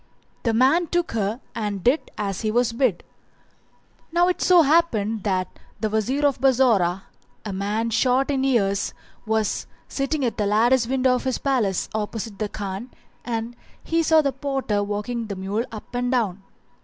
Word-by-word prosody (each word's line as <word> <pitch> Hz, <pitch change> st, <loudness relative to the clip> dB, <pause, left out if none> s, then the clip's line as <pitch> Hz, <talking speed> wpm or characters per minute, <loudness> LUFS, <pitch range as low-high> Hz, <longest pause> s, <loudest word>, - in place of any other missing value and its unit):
The 230 Hz, -, 0 dB
man 280 Hz, +9 st, +4 dB
took 350 Hz, +1 st, -1 dB
her 220 Hz, +2 st, -2 dB
and 205 Hz, -4 st, -3 dB
did 265 Hz, +6 st, +2 dB
as 200 Hz, -3 st, -3 dB
he 215 Hz, -, 0 dB
was 235 Hz, +1 st, +1 dB
bid. 230 Hz, -7 st, +1 dB, 1.1 s
Now 350 Hz, +2 st, +3 dB
it 365 Hz, -, -1 dB
so 355 Hz, -2 st, +6 dB
happened 230 Hz, -9 st, +2 dB
that 185 Hz, -2 st, 0 dB, 0.3 s
the 215 Hz, 0 st, -1 dB
Wazir 255 Hz, +7 st, 0 dB
of 280 Hz, -2 st, +1 dB
Bassorah, 230 Hz, -9 st, +3 dB, 0.4 s
a 205 Hz, -, -4 dB
man 210 Hz, +4 st, -1 dB
shot 255 Hz, +4 st, +2 dB
in 270 Hz, -1 st, 0 dB
years, 205 Hz, -7 st, +1 dB, 0.3 s
was 220 Hz, -1 st, 0 dB, 0.2 s
sitting 275 Hz, 0 st, -1 dB
at 235 Hz, -, -2 dB
the 210 Hz, -2 st, 0 dB
lattice 230 Hz, +4 st, +3 dB
window 260 Hz, 0 st, +2 dB
of 250 Hz, -, -2 dB
his 260 Hz, -2 st, 0 dB
palace 235 Hz, -9 st, 0 dB
opposite 215 Hz, -1 st, -4 dB
the 215 Hz, -1 st, -2 dB
Khan 200 Hz, +4 st, -5 dB, 0.3 s
and 230 Hz, 0 st, -3 dB, 0.3 s
he 330 Hz, 0 st, +1 dB
saw 320 Hz, -1 st, +4 dB
the 280 Hz, -, +1 dB
porter 270 Hz, -6 st, -1 dB
walking 210 Hz, +3 st, -3 dB
the 200 Hz, -, -4 dB
mule 195 Hz, +5 st, -2 dB
up 220 Hz, +2 st, -10 dB
and 245 Hz, +1 st, -1 dB
down. 210 Hz, -7 st, 0 dB
230 Hz, 165 wpm, -23 LUFS, 205-265 Hz, 1.1 s, so